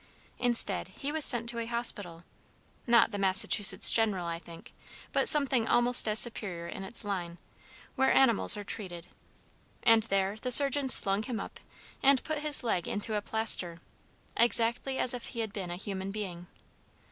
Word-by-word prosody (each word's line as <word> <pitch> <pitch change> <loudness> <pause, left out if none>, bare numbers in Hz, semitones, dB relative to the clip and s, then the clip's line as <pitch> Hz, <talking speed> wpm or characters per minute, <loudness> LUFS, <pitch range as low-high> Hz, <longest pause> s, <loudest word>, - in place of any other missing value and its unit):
Instead, 235 -6 +1
he 275 +10 -7
was 315 0 -1
sent 240 -4 +3
to 235 0 -4
a 230 - -6
hospital, 205 -8 +1 0.6
not 235 -1 +3
the 205 - -6
Massachusetts 195 0 +3
General, 210 -6 -1
I 170 0 -6
think, 170 -1 -15 0.4
but - - +2
something 270 -6 +3
almost 240 -1 +1
as 215 0 +1
superior 190 -8 +1
in 195 - -9
its 210 +4 -2
line, 175 -4 -6 0.6
where 265 +1 +1
animals 230 -5 +3
are 205 - -7
treated, 180 -5 -8 0.8
and 225 -1 +4
there 195 -1 -1
the 255 - -4
surgeons 275 0 +6
slung 195 +1 +3
him 230 0 -6
up, - - -10 0.4
and 275 -1 +2
put 310 -1 -5
his 300 -2 -2
leg 185 -7 -3
into 210 0 -4
plaster, 205 -6 -3 0.6
exactly 235 +3 0
as 255 - +1
if 245 - -8
he 230 - -6
had 220 -3 -7
been 190 -4 -7
a 175 - -6
human 190 0 -7
being. 185 -4 -8
220 Hz, 165 wpm, -28 LUFS, 190-240 Hz, 0.8 s, surgeons